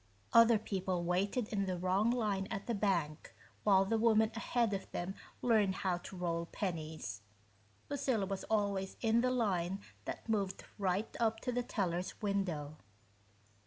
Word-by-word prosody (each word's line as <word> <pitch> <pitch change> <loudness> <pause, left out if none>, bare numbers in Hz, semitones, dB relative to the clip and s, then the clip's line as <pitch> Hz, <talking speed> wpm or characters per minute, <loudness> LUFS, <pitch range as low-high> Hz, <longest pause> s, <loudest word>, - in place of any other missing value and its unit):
Other 230 0 +8
people 190 -4 -2
waited 195 +6 0
in 200 -2 -1
the 185 -1 -1
wrong 185 +5 +2
line 210 -5 0
at 195 - -4
the 235 - -1
bank 175 -7 -1 0.3
while 195 -2 +5
the 225 +3 +1
woman 220 -1 +4
ahead 230 -1 +1
of 195 - -4
them 175 +2 -3 0.3
learned 215 -6 +3
how 185 -2 0
to 185 - -9
roll 170 -1 -1
pennies 155 - -4 0.7
Lucilla 255 -7 0
was 195 0 -3
always 200 -3 0
in 230 0 +3
the 255 - +2
line 195 -7 0 0.3
that - - -5
moved 200 -4 -1 0.2
right 195 +2 0
up 225 -1 +2
to 250 - -1
the 245 0 0
teller's 185 -6 -2
window. 180 -8 -1
195 Hz, 155 wpm, -35 LUFS, 180-220 Hz, 0.7 s, Other